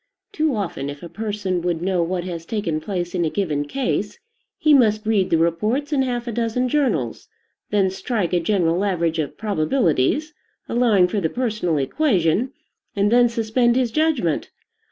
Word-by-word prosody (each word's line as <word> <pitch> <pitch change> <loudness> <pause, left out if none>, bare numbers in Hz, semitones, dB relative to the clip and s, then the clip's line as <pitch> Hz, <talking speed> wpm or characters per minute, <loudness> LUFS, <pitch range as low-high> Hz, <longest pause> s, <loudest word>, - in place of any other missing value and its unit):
Too 310 - 0
often, 170 -9 -3
if 145 +2 -8
a 170 - -7
person 205 -4 -3
would 175 -1 -1
know 185 -1 +1
what 175 +1 -1
has 170 -2 -5
taken 180 -6 -2
place 175 -1 -3
in 180 -2 0
a 160 - +1
given 155 -6 -1
case, 270 - -2 0.4
he 305 - +4
must 215 -5 +4
read 210 -4 +2
the 165 - +3
reports 215 - 0
in 275 - +2
half 245 -2 -2
a - - -2
dozen 235 +2 0
journals, 225 - 0 0.4
then 195 -2 +2
strike 190 -2 -2
a 175 - +3
general 175 0 +1
average 170 -5 0
of 150 - -3
probabilities, 210 - +1 0.3
allowing 225 -7 +3
for 200 +2 -2
the 160 - 0
personal 215 -9 -1
equation, 190 - +1 0.4
and 200 +1 +2
then 240 0 +5
suspend 235 +1 +1
his 250 -3 +1
judgment. 295 - 0
205 Hz, 170 wpm, -22 LUFS, 170-240 Hz, 0.4 s, then